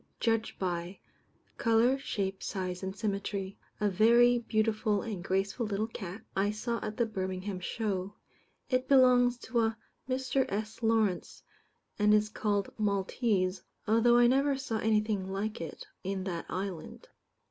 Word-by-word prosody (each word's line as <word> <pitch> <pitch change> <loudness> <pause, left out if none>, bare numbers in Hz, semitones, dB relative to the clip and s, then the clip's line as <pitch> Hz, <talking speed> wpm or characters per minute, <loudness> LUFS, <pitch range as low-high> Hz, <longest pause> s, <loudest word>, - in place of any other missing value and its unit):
Judged 225 -1 0
by: 175 0 -3 0.6
Colour, 230 +3 +4
shape, 195 -7 -3
size, 185 -2 -3
and 190 0 -4
symmetry. 200 -1 -3 0.2
A 210 - +2
very 235 +5 +5
beautiful 215 -2 0
and 205 -6 -5
graceful 195 +5 -1
little 205 +1 -1
cat, 205 -2 -7
I 195 +1 +2
saw 230 +2 -2
at 210 - -5
the 235 - +2
Birmingham 190 -2 -4
Show. 200 0 -3 0.5
It 255 0 0
belongs 250 -2 +5
to 235 +1 -1
a 225 0 +1 0.3
Mr. 260 +1 0
S. 215 +3 -4
Lawrence, 220 -5 0 0.6
and 210 0 +5
is 210 0 +2
called 205 -2 -1
"Maltese," 200 -1 0 0.3
although 230 +2 +5
I 240 - +6
never 270 +3 +3
saw 235 -5 -3
anything 210 -3 +1
like 205 0 -3
it 165 - -7 0.2
in 190 0 -2
that 175 -3 -4
island. 185 -4 -5
210 Hz, 140 wpm, -30 LUFS, 195-230 Hz, 0.6 s, I